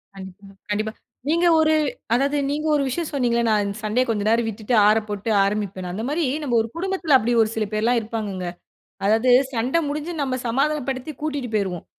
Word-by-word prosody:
கண்டிப்பா, 190 +1 -11 0.2
கண்டிப்பா. 215 +1 -1 0.4
நீங்க 340 +2 +3
ஒரு 315 0 +4 0.4
அதாவது 280 +4 +2
நீங்க 300 +2 -2
ஒரு 290 - +2
விஷயம் 315 +5 -2
சொன்னீங்கல்ல, 240 -4 +1
"நான் 210 -2 +2
சண்டையை 215 +4 +1
கொஞ்ச 210 -3 0
நேரம் 230 0 +2
விட்டுட்டு 220 +2 -4
ஆறப்போட்டு 210 0 0
ஆரம்பிப்பேன்" 195 -2 -2
அந்த 205 +5 -4
மாதிரி 320 +4 0 0.2
நம்ம 250 -5 0
ஒரு 225 - -3
குடும்பத்துல 355 -4 +1
அப்படி 240 0 0
ஒரு 220 - +2
சில 220 -1 0
பேர் 215 - -1
எல்லாம் 240 +1 +3
இருப்பாங்கங்க. 210 -5 -4 0.6
அதாவது 225 +5 +3 0.2
சண்டை 245 +8 +1
முடிஞ்சு 300 +4 -3
நம்ம 260 -2 -1
சமாதானப்படுத்தி 270 +2 -1
கூட்டிட்டு 285 -5 -3
போயிருவோம். 190 -5 -1
235 Hz, 170 wpm, -22 LUFS, 210-285 Hz, 0.6 s, ஒரு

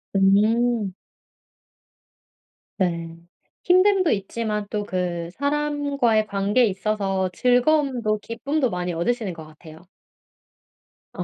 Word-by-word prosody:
음. 210 +2 +2 1.8
네. 170 -3 -2 0.5
힘듦도 370 -1 +4
있지만 210 +1 -2
또 210 -1 -2
그 175 -3 -3
사람과의 285 -6 0
관계에 205 +5 +2
있어서 195 -1 -1
즐거움도 250 - +2
기쁨도 260 +5 -2
많이 180 -1 -3
얻으시는 200 +3 -1
것 160 -1 -10
같아요. 155 +2 -15 1.3
아. - - -4
215 Hz, 205 characters per minute, -23 LUFS, 185-250 Hz, 1.8 s, 힘듦도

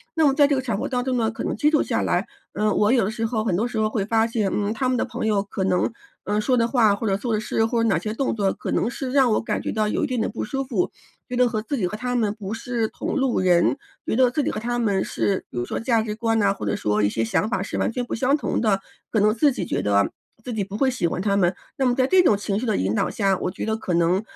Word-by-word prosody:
那 320 -1 +3
么 275 - +3
在 290 +1 +5
这 285 0 +2
个 - - 0
场 235 -6 -2
合 270 +7 -3
当 250 -1 -1
中 260 -1 0
呢， 225 -2 +1
可 225 - -6
能 - - -1
接 295 +7 +2
触 305 - +3
下 - - 0
来， - - 0 0.3
嗯， 210 +1 +1
我 210 0 +3
有 250 -3 +4
的 - - -1
时 225 0 -2
候 220 -1 -1
很 215 - 0
多 220 +7 0
时 240 - -5
候 215 0 +2
会 210 -2 -1
发 225 +1 +2
现， 220 -4 -1
嗯， 205 0 0
他 255 +3 -1
们 255 - +1
的 - - 0
朋 240 -1 -4
友 210 -2 +2
可 200 -1 -4
能， 185 +3 +1 0.3
嗯， 210 +1 0
说 255 +4 +2
的 230 -1 +3
话 225 -4 +3
或 220 +2 -3
者 195 -1 +1
做 230 +2 -2
的 215 - +1
事， 225 +1 0
或 230 0 0
者 230 - +2
哪 195 - +3
些 215 +6 -3
动 265 +2 -1
作 200 -3 +1
可 - - -7
能 - - +1
是 255 +1 -5
让 265 -3 +4
我 - - +2
感 - - -2
觉 - - -3
到 215 -1 0
有 210 - -1
一 - - +1
定 250 -4 -1
的 - - 0
不 225 - -4
舒 270 +4 -2
服， 270 +7 -1 0.4
觉 250 - -4
得 250 0 +4
和 220 -2 -2
自 280 +5 -3
己 190 -6 0
和 210 - -5
他 250 +2 -2
们 215 -4 +1
不 205 -1 -6
是 230 0 -2
同 - - -4
路 265 -3 +1
人， 180 +5 +3 0.3
觉 - - -1
得 255 +1 +4
自 295 +3 0
己 - - 0
和 - - -4
他 240 +2 -2
们 200 -5 +1
是 195 -2 -1
比 - - -9
如 120 - -1
说 - - -3
价 230 -1 +2
值 215 -1 -3
观 225 0 0
呐， 200 -2 +3
或 - - -9
者 100 - 0
说 105 0 0
一 100 - +3
些 115 +2 -1
想 115 - 0
法 195 - -1
是 - - -4
完 - - +1
全 245 +1 -3
不 - - -6
相 265 +5 +2
同 - - -1
的。 210 -4 +2 0.3
可 220 - +2
能 210 +1 +4
自 280 +6 +3
己 - - -3
觉 - - -1
得 100 -1 +2 0.3
自 245 - -5
己 215 -2 -1
不 200 +1 -6
会 265 +3 +3
喜 245 -9 0
欢 175 - -3
他 200 0 +1
们， 180 -2 +2 0.2
那 270 - +1
么 245 -1 +2
在 255 - +3
这 375 +5 +5
种 215 -12 +4
情 200 0 -2
绪 250 - -3
的 220 - +1
引 95 +2 0
导 - - +1
下， 195 -3 +1
我 - - -1
觉 - - -5
得 220 0 0
可 190 -5 -3
能， 170 +3 +2
220 Hz, 345 characters per minute, -23 LUFS, 200-245 Hz, 0.4 s, 在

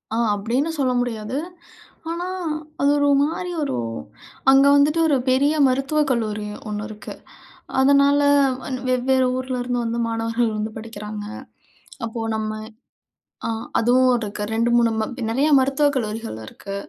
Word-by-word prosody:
அ - - 0 0.2
அப்படின்னு 240 +9 -1
சொல்ல 260 -2 +2
முடியாது. 235 +1 -3 0.7
ஆனா, 345 +2 -3 0.5
அது 280 - +4
ஒரு 285 0 +2
மாதிரி 330 +5 -1
ஒரு 285 - -2 0.8
அங்க 270 +1 +6
வந்துட்டு 295 +3 +3
ஒரு 290 -3 +3
பெரிய 275 +4 +3
மருத்துவக் 275 +3 +1
கல்லூரி 215 -3 -1 0.2
ஒண்ணு 210 0 -4
இருக்கு. 215 -1 -9 0.7
அதனால 280 +1 +5 0.4
வன் 260 - -4
வெவ்வேறு 255 +1 +2
ஊரிலேருந்து 250 -1 -2
வந்து 230 +1 -2
மாணவர்கள் 225 0 -1
வந்து 215 +1 -3
படிக்கிறாங்க. 210 -1 -7 0.8
அப்போ 230 0 -5
நம்ம 215 0 -2 1.0
அ - - -2 0.3
அதுவும் 255 +2 +4
இருக்கு. 210 -2 -5
2 230 +1 +1
3 235 -1 +4
ம 220 - 0 0.2
நிறைய 265 +6 +1
மருத்துவக் 275 +2 +2
கல்லூரிகள் 225 - -3
இருக்கு. 195 - -8
245 Hz, 130 wpm, -22 LUFS, 220-275 Hz, 1.0 s, அங்க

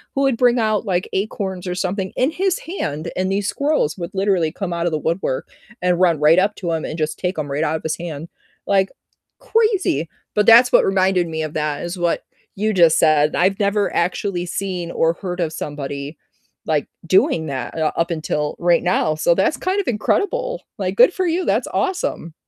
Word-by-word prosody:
who 275 - +1
would 270 -4 +2
bring 245 -1 +3
out, 215 -2 +1
like, 180 -3 -1
acorns, 190 -2 -3
or 180 - -2
something 185 +1 -2
in 260 +4 +1
his 375 +2 0
hand, 155 - -4
and 185 +1 0
these 200 +1 0
squirrels 280 - 0
would 170 0 -5
literally 190 -4 +1
come 195 -4 -4
out 170 0 -2
of 170 - 0
the - - +1
woodwork, 160 -4 -2 0.3
and 180 -1 +1
run 170 -5 +3
right 160 +4 +6
up 200 +2 +1
to 175 -3 -3
him, 160 -1 -2
and 155 - -5
just 155 -1 -2
take 180 -1 -2
'em 145 -2 -3
right 150 +3 0
out 155 - 0
of 160 - -5
his 160 - -2
hand, 165 -2 -6 0.4
like, 195 -1 +2 0.5
crazy, 430 - +1 0.3
but 210 -1 +3
that's 240 +2 +7
what - - +5
reminded 190 -2 +2
me 160 -1 -3
of 155 - -4
that 150 -1 -2
is 175 +2 -5
what 175 -1 0 0.4
you 215 +1 +1
just 170 -4 +5
said, 150 -2 +3
I've 190 +2 +2
never 205 0 +1
actually 180 +1 -1
seen, 180 -2 -3
or 165 0 +1
heard 180 0 -6
of 165 -2 -1
somebody, 145 0 -5 0.5
like, 150 -3 0 0.2
doing 165 -2 +3
that, 130 -4 -5
uh, 155 -1 +1
up 170 +1 0
until 150 -2 -2
right 175 0 +3
now, 175 -3 +1
so, 165 +2 +2
that's 190 - +1
kind 375 +2 -1
of 400 - -2
incredible, - - -1 0.2
like, - - -2
good - - +6
for 370 -2 -1
you, 345 +2 0
that's - - +1
awesome. 360 - -2
180 Hz, 205 wpm, -20 LUFS, 160-210 Hz, 0.5 s, that's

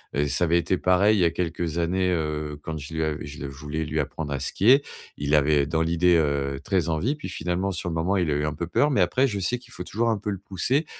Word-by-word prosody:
Heu, 75 +1 +1
ça 70 - +1
avait 85 +1 +3
été 85 +2 +1
pareil, 95 +5 +3
il - - +1
y - - +5
a - - +4
quelques 85 -1 -3
années, 90 +2 +1
heu, 75 -3 -2
quand 80 -1 -4
je 75 +1 -8
lui 80 0 -1
avais 75 -1 -2
je 70 0 -9
le 70 - -4
je 70 - -11
voulais 75 +2 -3
lui 75 +1 -2
apprendre 75 +1 -3
à 70 - -2
skier. - - -4 0.6
Il 75 +1 +1
avait, 75 -1 +3
dans 80 +2 0
l'idée, 85 +2 +3
heu, 70 -3 0
très 90 -4 0
envie, 90 - 0
puis 150 -10 -7
finalement, 90 +2 -2
sur 90 -1 -3
le - - -3
moment, 85 +5 0
il 85 -4 +1
a - - +2
eu 75 +1 0
un 75 - -1
peu 85 +4 -4
peur, 145 - +2
mais 130 -9 +2
après, 125 +10 +3
je 105 -5 -3
sais 120 +6 -1
qu'il 125 0 -17
faut - - -6
toujours 115 +2 -1
un 110 - +1
peu 105 +1 -5
le 100 - -3
pousser 105 - 0
85 Hz, 285 wpm, -25 LUFS, 75-95 Hz, 0.6 s, y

